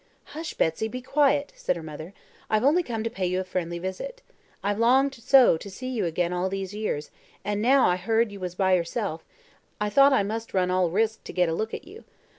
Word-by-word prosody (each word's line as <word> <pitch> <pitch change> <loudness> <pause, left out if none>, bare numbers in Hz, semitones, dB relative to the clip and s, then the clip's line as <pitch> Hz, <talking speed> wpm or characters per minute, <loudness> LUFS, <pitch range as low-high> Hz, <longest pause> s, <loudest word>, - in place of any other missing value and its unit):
"Hush! 320 +3 -6
Betsy, 160 +7 0
be 250 +3 -6
quiet," 285 +1 +2
said - - -1
her 170 - -7
mother. 155 +4 -9 0.3
"I've 215 +1 +2
only 305 +7 +4
come 230 -9 -4
to 230 - -1
pay 185 -2 -2
you 185 +1 0
a - - -1
friendly 175 -2 -3
visit. 190 - -6 0.4
I've 205 +1 -1
longed 265 +4 +4
so 250 -5 +5
to 200 - -9
see 255 +7 -6
you 230 -7 -1
again 170 +1 -1
all 180 +1 -1
these 195 0 -4
years, 210 -8 -3 0.3
and 205 0 -1
now 260 +4 +5
I 180 - +2
heard 225 +4 +1
you 200 - -9
was 180 -1 -5
by 190 0 +2
yourself, 170 -1 -1 0.6
I 210 0 -1
thought 275 +5 +6
I 265 -7 +3
must 220 +2 -4
run 180 -1 +2
all 185 -1 +2
risks 220 +5 0
to - - -8
get 180 -2 +2
a - - -1
look 220 +6 -2
at - - -9
you. 400 +6 -13
205 Hz, 230 wpm, -26 LUFS, 180-250 Hz, 0.6 s, thought